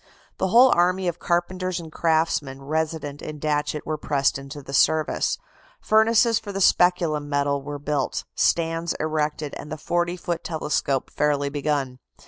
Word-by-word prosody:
The 190 Hz, -, +1 dB
whole 245 Hz, +6 st, +6 dB
army 180 Hz, +2 st, +2 dB
of 175 Hz, 0 st, -2 dB
carpenters 180 Hz, +1 st, -1 dB
and 165 Hz, -2 st, -9 dB
craftsmen 155 Hz, -5 st, 0 dB
resident 155 Hz, -1 st, -3 dB
in 155 Hz, 0 st, -6 dB
Datchet 150 Hz, 0 st, -1 dB
were 155 Hz, -1 st, -3 dB
pressed 140 Hz, -2 st, +1 dB
into 140 Hz, +1 st, -9 dB
the 135 Hz, -, -9 dB
service. 155 Hz, +3 st, +2 dB, 0.4 s
Furnaces 225 Hz, +1 st, +4 dB
for 205 Hz, -, -8 dB
the 195 Hz, -, -4 dB
speculum 170 Hz, -6 st, +3 dB
metal 140 Hz, -1 st, 0 dB
were 145 Hz, +1 st, -6 dB
built, 145 Hz, -1 st, -2 dB
stands 165 Hz, 0 st, +1 dB
erected, 155 Hz, -1 st, -2 dB
and 150 Hz, -, -9 dB
the 155 Hz, -, -4 dB
40 175 Hz, +3 st, -1 dB
foot 170 Hz, -1 st, -3 dB
telescope 150 Hz, -4 st, -1 dB
fairly 145 Hz, -1 st, +1 dB
begun. 140 Hz, -3 st, -2 dB
155 Hz, 150 wpm, -24 LUFS, 145-175 Hz, 0.4 s, whole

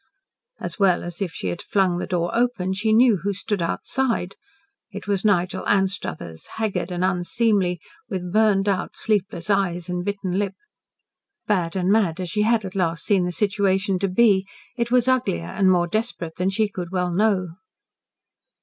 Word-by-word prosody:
As -, -, -5 dB
well 190 Hz, -3 st, +3 dB
as 175 Hz, +2 st, -7 dB
if 185 Hz, -4 st, -1 dB
she 95 Hz, -, -4 dB
had 85 Hz, -, -4 dB
flung 185 Hz, -3 st, +1 dB
the -, -, -4 dB
door 175 Hz, -1 st, -1 dB
open, 235 Hz, -6 st, +1 dB
she 210 Hz, +3 st, 0 dB
knew 230 Hz, -1 st, +5 dB
who 200 Hz, +3 st, -2 dB
stood 205 Hz, 0 st, -2 dB
outside. 225 Hz, +2 st, -1 dB, 0.5 s
It 205 Hz, 0 st, -9 dB
was 200 Hz, -2 st, 0 dB
Nigel 185 Hz, -4 st, +1 dB
Anstruthers, 190 Hz, -, -1 dB
haggard 200 Hz, -5 st, -1 dB
and 180 Hz, +1 st, 0 dB
unseemly, 185 Hz, 0 st, +1 dB, 0.3 s
with 180 Hz, -2 st, -4 dB
burned 210 Hz, -2 st, +3 dB
out, 195 Hz, -2 st, -1 dB
sleepless 200 Hz, -4 st, -1 dB
eyes 180 Hz, -3 st, 0 dB
and 180 Hz, 0 st, -2 dB
bitten 195 Hz, -1 st, -2 dB
lip. 195 Hz, -2 st, -2 dB, 0.9 s
Bad 180 Hz, -5 st, 0 dB
and 185 Hz, 0 st, +1 dB
mad 195 Hz, -6 st, +2 dB
as 180 Hz, -2 st, -4 dB
she 210 Hz, -, +1 dB
had 220 Hz, -1 st, +2 dB
at 190 Hz, -, -6 dB
last 170 Hz, -4 st, -1 dB
seen 195 Hz, -4 st, +3 dB
the 180 Hz, -, -2 dB
situation 195 Hz, 0 st, +1 dB
to 195 Hz, -, +1 dB
be, 195 Hz, 0 st, +4 dB, 0.3 s
it 235 Hz, -1 st, -1 dB
was 250 Hz, 0 st, +3 dB
uglier 245 Hz, -, +1 dB
and 185 Hz, -, +2 dB
more 175 Hz, -1 st, +3 dB
desperate 180 Hz, -4 st, -3 dB
than 180 Hz, +1 st, +1 dB
she 215 Hz, +2 st, +1 dB
could 180 Hz, -4 st, -6 dB
well 180 Hz, -1 st, 0 dB
know. 195 Hz, -2 st, +2 dB
190 Hz, 175 wpm, -23 LUFS, 180-210 Hz, 0.9 s, knew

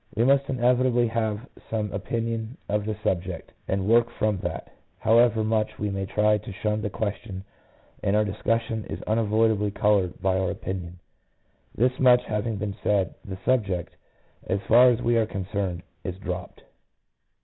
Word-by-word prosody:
We 115 Hz, -, +2 dB
must 140 Hz, +2 st, +3 dB
inevitably 125 Hz, -1 st, +2 dB
have 110 Hz, +1 st, -2 dB, 0.2 s
some 110 Hz, -2 st, -2 dB
opinion 115 Hz, +3 st, -3 dB
on 105 Hz, 0 st, 0 dB
the 110 Hz, -2 st, -2 dB
subject, 90 Hz, -1 st, -2 dB, 0.2 s
and 95 Hz, 0 st, -1 dB
work 115 Hz, +1 st, +4 dB
from 110 Hz, -4 st, -1 dB
that; -, -, -5 dB, 0.2 s
however 115 Hz, 0 st, +4 dB
much 110 Hz, 0 st, 0 dB
we 105 Hz, -1 st, -2 dB
may 95 Hz, -1 st, -3 dB
try 105 Hz, +1 st, +2 dB
to 105 Hz, -, -9 dB
shun 105 Hz, +2 st, -1 dB
the 105 Hz, -, -2 dB
question, 100 Hz, -2 st, -4 dB, 0.6 s
our 105 Hz, +2 st, +2 dB
discussion 110 Hz, +2 st, -1 dB
is -, -, -6 dB
unavoidably 110 Hz, -1 st, +2 dB
coloured 100 Hz, -3 st, +1 dB
by 95 Hz, -1 st, +1 dB
our 95 Hz, -1 st, 0 dB
opinion. 90 Hz, -1 st, -5 dB, 0.8 s
This 125 Hz, +3 st, +1 dB
much 125 Hz, -1 st, +6 dB
having 110 Hz, +1 st, -2 dB
been 100 Hz, -1 st, -3 dB
said, 100 Hz, -4 st, +1 dB
the 95 Hz, -1 st, -7 dB
subject, 100 Hz, -9 st, 0 dB, 0.5 s
as 95 Hz, -, 0 dB
far 125 Hz, +4 st, +6 dB
as 120 Hz, 0 st, 0 dB
we 120 Hz, 0 st, +3 dB
are 110 Hz, -2 st, +2 dB
concerned, 95 Hz, -3 st, -3 dB, 0.2 s
is 90 Hz, -1 st, -4 dB
dropped. 90 Hz, -2 st, -6 dB
105 Hz, 155 wpm, -26 LUFS, 100-115 Hz, 0.8 s, much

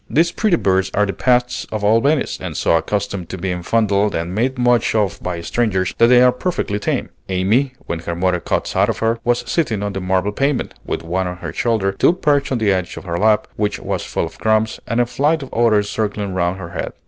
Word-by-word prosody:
These 170 Hz, +3 st, +3 dB
pretty 210 Hz, -2 st, +2 dB
birds 95 Hz, -4 st, +1 dB
are 105 Hz, -, +3 dB
the 100 Hz, -, -3 dB
pets 125 Hz, -1 st, +1 dB
of 110 Hz, -1 st, -3 dB
all 110 Hz, +3 st, +4 dB
Venice, 145 Hz, +2 st, +1 dB
and -, -, -5 dB
so -, -, +2 dB
accustomed 100 Hz, 0 st, -2 dB
to 95 Hz, -, -5 dB
being 90 Hz, 0 st, -3 dB
fondled 105 Hz, +1 st, +1 dB
and 85 Hz, +2 st, -3 dB
made 125 Hz, +6 st, 0 dB
much 120 Hz, -2 st, +2 dB
of 100 Hz, -2 st, 0 dB
by 90 Hz, -2 st, -4 dB
strangers, 95 Hz, -1 st, 0 dB
that 115 Hz, -, +6 dB
they 125 Hz, 0 st, +6 dB
are 125 Hz, -, +6 dB
perfectly 125 Hz, -, -2 dB
tame. -, -, -2 dB, 0.2 s
Amy, 105 Hz, +9 st, +1 dB
when 85 Hz, -, -3 dB
her 85 Hz, +1 st, -4 dB
mother 90 Hz, 0 st, +1 dB
caught -, -, -1 dB
sight -, -, +1 dB
of -, -, -1 dB
her, 115 Hz, +1 st, 0 dB
was 120 Hz, 0 st, +1 dB
sitting 115 Hz, -, 0 dB
on 100 Hz, -1 st, -3 dB
the 95 Hz, -, -4 dB
marble 95 Hz, +2 st, 0 dB
pavement, 140 Hz, +5 st, -1 dB
with -, -, -4 dB
one 90 Hz, +3 st, -1 dB
on 90 Hz, 0 st, -5 dB
her -, -, -6 dB
shoulder, 110 Hz, -5 st, +1 dB
two 95 Hz, -, +3 dB
perched 145 Hz, -6 st, +1 dB
on 130 Hz, -, +1 dB
the 110 Hz, -3 st, +2 dB
edge 90 Hz, -1 st, -3 dB
of -, -, -7 dB
her 85 Hz, -2 st, -3 dB
lap, 105 Hz, 0 st, +3 dB
which 105 Hz, -1 st, 0 dB
was -, -, -3 dB
full -, -, -2 dB
of -, -, -11 dB
crumbs, 110 Hz, 0 st, +1 dB
and 115 Hz, -, 0 dB
a 120 Hz, -, +4 dB
flight 145 Hz, +5 st, 0 dB
of 135 Hz, -, -11 dB
others 110 Hz, -3 st, +3 dB
circling 105 Hz, -2 st, -2 dB
round 90 Hz, 0 st, 0 dB
her 90 Hz, -3 st, -7 dB
head. -, -, -4 dB
105 Hz, 235 wpm, -19 LUFS, 95-120 Hz, 0.2 s, that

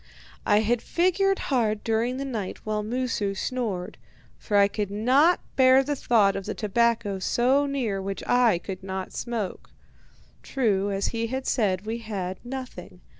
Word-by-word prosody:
"I 210 Hz, +1 st, +4 dB
figured 370 Hz, -, +1 dB, 0.2 s
hard 215 Hz, -4 st, +1 dB
during 230 Hz, +3 st, 0 dB
the 275 Hz, -, -3 dB
night 220 Hz, -8 st, -4 dB
while 215 Hz, -1 st, -1 dB
Moosu 220 Hz, -3 st, -2 dB
snored, 210 Hz, -6 st, -3 dB, 0.4 s
for 205 Hz, -, 0 dB
I 200 Hz, 0 st, +6 dB
could 205 Hz, -1 st, -3 dB
not 260 Hz, -, +3 dB
bear 260 Hz, 0 st, +6 dB
the 290 Hz, +2 st, -2 dB
thought 210 Hz, -7 st, +3 dB
of 195 Hz, 0 st, -5 dB
the 215 Hz, -, -3 dB
tobacco 225 Hz, -2 st, 0 dB
so 260 Hz, +8 st, +2 dB
near 240 Hz, -9 st, -2 dB
which 195 Hz, 0 st, -5 dB
I 245 Hz, -6 st, +4 dB
could 185 Hz, +2 st, -7 dB
not 190 Hz, 0 st, -5 dB
smoke. 225 Hz, -6 st, -4 dB, 0.7 s
True, 205 Hz, -6 st, 0 dB
as 195 Hz, 0 st, -1 dB
he 230 Hz, 0 st, -2 dB
had 260 Hz, +2 st, -4 dB
said, 200 Hz, -5 st, 0 dB
we 225 Hz, +2 st, -3 dB
had 190 Hz, -5 st, -5 dB
nothing. 255 Hz, +1 st, -8 dB
225 Hz, 155 wpm, -26 LUFS, 200-255 Hz, 0.7 s, I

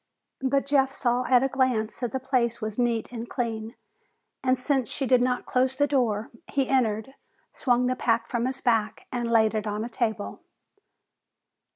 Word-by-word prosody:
But 270 Hz, +1 st, +1 dB
Jeff 275 Hz, -1 st, +3 dB
saw 250 Hz, -1 st, 0 dB
at 250 Hz, 0 st, +4 dB
a -, -, +3 dB
glance 255 Hz, -5 st, 0 dB
that 245 Hz, -3 st, -2 dB
the 265 Hz, -, -2 dB
place 245 Hz, -3 st, 0 dB
was 215 Hz, 0 st, -4 dB
neat 235 Hz, -2 st, 0 dB
and 235 Hz, -1 st, -6 dB
clean, 225 Hz, -3 st, -3 dB, 0.7 s
and 255 Hz, 0 st, +3 dB
since 260 Hz, -2 st, 0 dB
she 275 Hz, -, -3 dB
did 255 Hz, -1 st, +4 dB
not 250 Hz, 0 st, 0 dB
close 260 Hz, +1 st, +1 dB
the 285 Hz, +2 st, +3 dB
door, 230 Hz, -7 st, 0 dB, 0.2 s
he 275 Hz, -2 st, +1 dB
entered, 230 Hz, -2 st, +1 dB, 0.4 s
swung 250 Hz, -2 st, +2 dB
the 255 Hz, 0 st, +1 dB
pack 230 Hz, -2 st, +1 dB
from 240 Hz, 0 st, -1 dB
his 260 Hz, 0 st, -4 dB
back, 225 Hz, -4 st, +1 dB
and 240 Hz, -2 st, -2 dB
laid 220 Hz, -1 st, +4 dB
it 215 Hz, -1 st, -2 dB
on 210 Hz, +1 st, -2 dB
a -, -, -6 dB
table. 220 Hz, -3 st, -2 dB
245 Hz, 180 wpm, -26 LUFS, 225-260 Hz, 0.7 s, at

